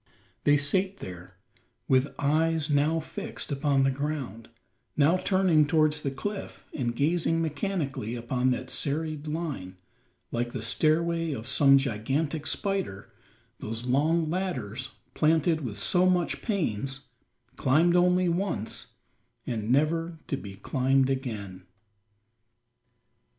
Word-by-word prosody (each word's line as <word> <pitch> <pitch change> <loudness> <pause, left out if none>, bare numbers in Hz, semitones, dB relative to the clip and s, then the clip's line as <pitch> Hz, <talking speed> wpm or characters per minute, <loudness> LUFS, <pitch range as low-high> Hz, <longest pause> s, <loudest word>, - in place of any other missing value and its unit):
There 145 0 +6
sate 190 +7 +1
they, 90 - -7 0.7
with 130 +1 +3
eyes 155 +1 +1
now 150 +3 +2
fixed 160 - -6
upon 140 -1 +2
the 135 - +3
ground, 130 -6 -4 0.5
now 150 +4 +5
turning 185 -6 +3
towards 155 -1 +2
the 140 - -1
cliff 200 +10 -6
and 120 -4 -2
gazing 165 +4 +1
mechanically 155 - -2
upon 125 +2 0
that 130 0 -2
serried 155 +2 -2
line, 145 - -4 0.5
like 120 0 -2
the 120 - -4
stairway 165 +5 +2
of 115 -4 -6
some 135 +2 +5
gigantic 135 +5 -1
spider 195 - -2 0.5
those 115 +2 -5
long 155 +6 +2
ladders, 135 - -3 0.2
planted 160 +1 +2
with 115 -8 -5
so 180 - +3
much 180 -2 0
pains, 135 - -2 0.5
climbed 155 +7 +3
only 180 +1 +4
once, 170 - -2 0.5
and 110 -3 -3
never 165 +4 +1
to - - -2
be 100 -7 -8
climbed 135 +5 +1
again! 100 -9 -5
145 Hz, 120 wpm, -27 LUFS, 125-165 Hz, 0.7 s, There